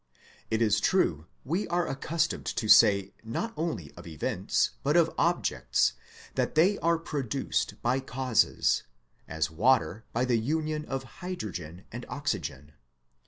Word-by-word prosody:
It 110 +1 +2
is 110 -1 +3
true 85 - +1 0.2
we 175 +9 -1
are 175 0 0
accustomed 160 +4 -1
to 115 -1 -2
say 100 -3 +6
not 170 - -3
only 155 - -3
of - - -12
events, 80 -2 0
but - - +2
of - - +3
objects, 65 0 +1 0.4
that - - -1
they 185 +6 +4
are 170 0 +2
produced 140 -6 -2
by 125 +3 +2
causes, 130 -2 +1 0.5
as 80 -1 -2
water 110 +1 +2
by 120 +2 0
the 120 -2 +2
union 155 +4 -1
of 135 -2 -3 0.2
hydrogen 95 - -6
and 120 +2 -7
oxygen. 75 - -3
120 Hz, 135 wpm, -28 LUFS, 95-155 Hz, 0.5 s, say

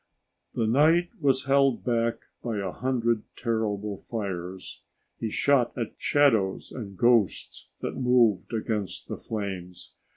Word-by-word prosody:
The 115 - +1
night 160 +9 +4
was 135 -3 +2
held 135 -2 +3
back 115 -2 0 0.2
by 115 -3 -3
a 95 -2 -2
hundred 120 -2 0
terrible 105 -3 -2
fires. 95 -4 -6 0.4
He 115 - -2
shot 135 +2 +2
at 115 -3 -3
shadows 115 -10 +2
and 100 -6 -7
ghosts 120 -4 +2 0.2
that - - -3
moved 120 -7 +3
against 110 -4 -3
the - - -5
flames. 95 -5 -6
115 Hz, 125 wpm, -27 LUFS, 100-125 Hz, 0.4 s, night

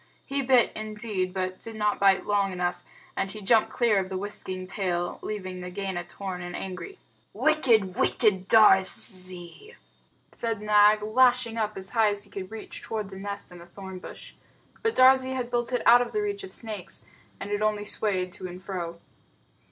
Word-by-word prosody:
He 275 0 -1
bit, 255 -2 +4
indeed, 215 -3 -3
but 185 0 -3
did 225 -1 -8
not 210 -1 0
bite 195 -1 +4
long 200 -1 +1
enough, 180 -1 -2 0.3
and 195 - -1
he 215 - -7
jumped 215 +2 +3
clear 230 -5 +2
of 190 -1 -3
the 190 - -3
whisking 185 -2 -3
tail, 180 -2 -2
leaving 185 -3 -5
Nagaina 180 0 -4
torn 190 -2 -6
and 175 0 -6
angry. 190 - -6 0.4
"Wicked, 240 -11 +3
wicked 190 -5 +2
Darzee!" 190 - +2 0.6
said 230 -2 -3
Nag, 210 0 +5
lashing 245 +1 +3
up 215 -2 -2
as 190 0 -6
high 225 -3 +4
as 205 0 -2
he - - -15
could 190 -2 -6
reach 220 -1 -8
toward 215 -3 -4
the 195 - -10
nest 200 -1 -6
in 175 - -11
the 170 - -13
thorn 190 +1 -9
bush. - - -11 0.5
But 450 0 0
Darzee 260 0 +5
had 245 -2 -3
built 240 0 -1
it 245 -2 0
out 240 +1 +8
of 245 - -4
reach 410 -1 -1
of 385 - -8
snakes, 210 -5 -6 0.3
and 200 - -6
it 205 0 -1
only 210 -1 0
swayed 190 -4 +1
to 185 - -6
and 180 0 -9
fro. 175 -3 -5
205 Hz, 180 wpm, -27 LUFS, 185-230 Hz, 0.6 s, out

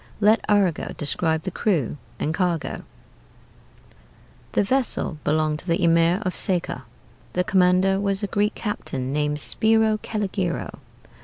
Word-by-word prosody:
Let 215 +2 +4
Arago 195 -6 +1
describe 160 +2 0
the 190 - -3
crew 165 - 0 0.2
and 155 - -1
cargo: 175 -2 -1 1.7
"The - - +3
vessel 235 - -1
belonged 155 0 +1
to - - -11
the 170 +1 +1
Emir 170 +4 +3
of 185 - 0
Seca. 175 - -2 0.5
The 180 - +1
commander 185 +1 +3
was 200 0 0
a - - +3
Greek 205 +2 0
captain 135 - -3
named 150 0 0
Spiro 220 +5 +2
Calligero. 195 -5 -3
180 Hz, 130 wpm, -23 LUFS, 160-205 Hz, 1.7 s, Let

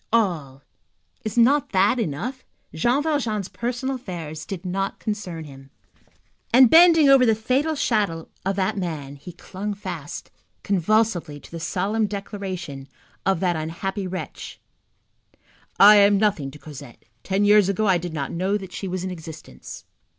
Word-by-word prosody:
All,—is 175 - -4
not 265 +3 +3
that 200 +6 +3
enough? 230 - -3 0.3
Jean 240 - +1
Valjean's 235 - -1
personal 250 +3 -3
affairs 165 -9 -7
did 190 -1 -6
not 195 +2 -2
concern 185 -6 -5
him. 135 -2 -13 0.8
And 250 0 +7
bending 330 -3 +7
over 270 -2 +7
the 225 -3 +4
fatal 265 +8 0
shadow 205 - 0 0.2
of 195 +1 -1
that 195 +1 -1
man, 150 -6 -5
he 145 +6 -10
clung 200 +4 -6
fast, 200 - -7 0.3
convulsively, 195 -5 +1
to - - -15
the 170 - -6
solemn 200 +6 -1
declaration 190 -8 -6 0.4
of 190 -3 +1
that 180 -2 +1
unhappy 185 +5 -4
wretch: 185 0 -7 1.2
"I 210 +1 +9
am 200 0 +5
nothing 195 -9 0
to 145 - -12
Cosette. 145 -4 -12 0.2
Ten 195 +1 0
years 205 -2 +5
ago 200 +2 0
I 190 -3 +3
did 175 0 -6
not 145 -3 -4
know 190 +4 0
that 190 -3 -10
she 195 - -5
was 185 0 -3
in 185 - -4
existence." 160 - -10
195 Hz, 150 wpm, -23 LUFS, 165-220 Hz, 1.2 s, I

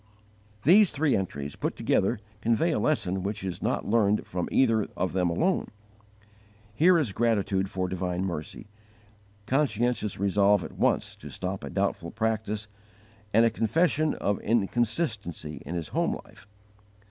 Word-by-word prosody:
These 190 +6 +7
three 145 0 +1
entries, 70 -7 -3
put - - -3
together, 105 +6 +1 0.2
convey 115 +10 +2
a - - 0
lesson 95 -11 0
which 100 +1 -3
is 95 -2 -4
not - - -1
learned 105 -1 +2
from 90 -1 -3
either 115 -5 +3
of 95 - -1
them 90 -2 +1
alone. 175 - +1 1.1
Here 170 +9 +5
is 135 -11 0
gratitude 100 -4 +1
for 95 -1 -2
divine 90 0 -2
mercy, 85 -5 -5 0.8
conscientious 120 -6 0
resolve 100 0 +3
at - - -7
once - - +1
to - - -10
stop 95 +1 -4
a - - -5
doubtful 100 -3 -1
practice, 110 0 -2 0.6
and 115 +3 +5
a 115 - +3
confession 155 +5 +1
of 100 0 -1
inconsistency 110 - -1
in 85 - -4
his 85 -2 -4
home - - 0
life. - - -18
105 Hz, 145 wpm, -27 LUFS, 95-120 Hz, 1.1 s, These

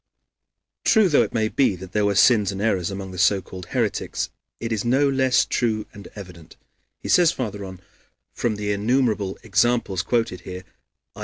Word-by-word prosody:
"True 220 -3 +4
though 150 - +4
it - - -1
may 110 -2 0
be 120 -3 +1
that 90 0 -10
there 105 +1 +1
were 100 - 0
sins 105 -2 +4
and 95 - -6
errors 100 -5 0
among 95 -1 -6
the 90 - -7
so 100 +1 +4
called 90 -1 -10
heretics, - - -2 0.3
it 115 0 -4
is 110 -2 -1
no 130 +4 +2
less 130 -2 +2
true 110 -3 -1
and 100 - -11
evident," 90 -5 -11 0.5
he - - -5
says 175 -3 +5
farther 105 -5 -5
on, 95 -2 -9 0.5
"from 115 -3 -1
the 105 0 -3
innumerable 105 -2 0
examples 105 -2 +1
quoted 115 -4 -1
here 90 0 -8 0.5
(i. - - -12
105 Hz, 180 wpm, -23 LUFS, 95-120 Hz, 0.5 s, says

